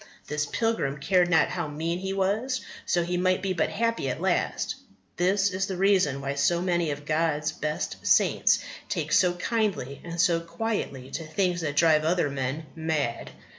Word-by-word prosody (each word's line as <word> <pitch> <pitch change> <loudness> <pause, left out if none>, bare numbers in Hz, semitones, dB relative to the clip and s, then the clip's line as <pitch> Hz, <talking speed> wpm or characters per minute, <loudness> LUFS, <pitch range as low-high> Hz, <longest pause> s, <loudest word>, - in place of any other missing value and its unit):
This 150 0 -2
pilgrim 225 -12 -1
cared 180 +4 +2
not 165 -2 +4
how 175 -3 -3
mean 165 +4 -3
he 190 +1 -3
was, 210 +7 0 0.3
so 175 - +2
he 180 +1 -1
might 185 +1 +1
be 190 -1 0
but 165 -3 0
happy 230 -9 -1
at - - -3
last. - - 0 0.4
That 180 +2 +3
is 195 -1 +1
the 190 - -4
reason 185 -8 +3
why 140 0 -2
so 140 +5 +2
many 175 -2 0
of 145 0 -5
God's 155 0 0
best 155 -1 -3
saints - - +4 0.3
take - - -2
so 180 -1 +4
kindly 185 - -2
and 170 0 -6
so 170 -2 +4
quietly 165 - -4
to 165 - -4
things 175 +1 0
that 145 -3 -2
drive 155 0 +4
other 160 -2 +1
men 135 +3 -3
mad. 155 -7 -2
170 Hz, 175 wpm, -27 LUFS, 150-190 Hz, 0.4 s, not